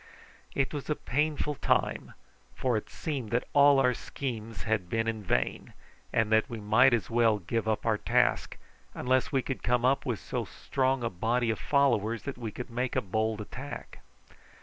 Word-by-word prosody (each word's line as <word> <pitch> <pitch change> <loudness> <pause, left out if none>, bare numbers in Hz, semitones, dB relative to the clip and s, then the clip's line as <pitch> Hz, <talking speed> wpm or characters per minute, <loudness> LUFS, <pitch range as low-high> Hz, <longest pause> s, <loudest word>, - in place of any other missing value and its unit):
It 135 0 0
was 145 0 -5
a 150 - +2
painful 150 +3 -1
time, - - 0 0.4
for 125 -2 0
it 110 - -3
seemed 135 -8 -4
that 120 +3 0
all 140 -1 +6
our 125 -1 +4
schemes 115 -6 -5
had 110 -5 -1
been 115 +2 0
in 110 -1 -2
vain, 90 - -1 0.4
and 110 -1 +1
that 110 +5 +3
we 115 -2 -5
might 110 +6 +5
as 120 -1 0
well 115 -2 +4
give 105 +4 -2
up 110 -1 0
our 110 -2 +2
task, - - +1 0.4
unless 130 +3 +1
we 135 -3 +1
could 135 - -4
come 120 0 +1 0.2
with 120 -6 -1
so - - -3
strong 130 -1 -1
a 115 - 0
body 115 +5 0
of 110 - -4
followers 115 -6 +2
that 140 -3 -6
we 115 -3 -4
could 125 +2 -7
make 125 +2 -2
a - - +2
bold 110 +2 -1
attack. 130 +6 -8
120 Hz, 180 wpm, -29 LUFS, 110-135 Hz, 0.4 s, all